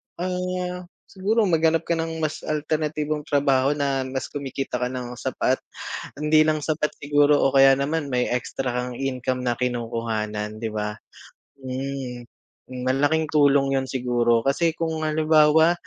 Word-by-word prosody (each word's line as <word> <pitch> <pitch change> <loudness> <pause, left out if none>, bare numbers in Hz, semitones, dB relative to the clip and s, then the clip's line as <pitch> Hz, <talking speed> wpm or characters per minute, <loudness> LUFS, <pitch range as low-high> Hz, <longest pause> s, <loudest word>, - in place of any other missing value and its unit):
ah, 180 0 -3 0.2
siguro 210 +4 0
maghanap 165 -3 +2
ka 170 0 -1
ng 160 0 -3
mas 155 0 -1
alternatibong 150 0 -1
trabaho 140 -1 +2
na 135 -2 -1
mas 130 0 -4
kumikita 135 -2 -4
ka 125 - 0
nang 125 -1 -5
sapat. - - 0 0.6
Hindi 155 +1 +4
lang 155 0 +1
sapat 150 0 -1
siguro 145 0 +3
o 135 0 +2
kaya 135 0 +8
naman 150 +2 -1
may 125 -1 +1
extra 125 +2 -3
kang 125 0 -4
income 130 -1 -2
na 120 -1 0
kinukuhanan 115 -3 -3
di 115 - -2
ba? 105 0 -3 0.7
hmm, 130 -1 -5 0.4
hmm 125 -1 -6
malaking 145 +5 +2
tulong 140 -2 +3
yun 135 - -1
siguro 120 -2 +1
kasi 165 +5 +2
kung 160 -1 -2
halimbawa, 155 +1 +4
140 Hz, 145 wpm, -24 LUFS, 125-155 Hz, 0.7 s, kaya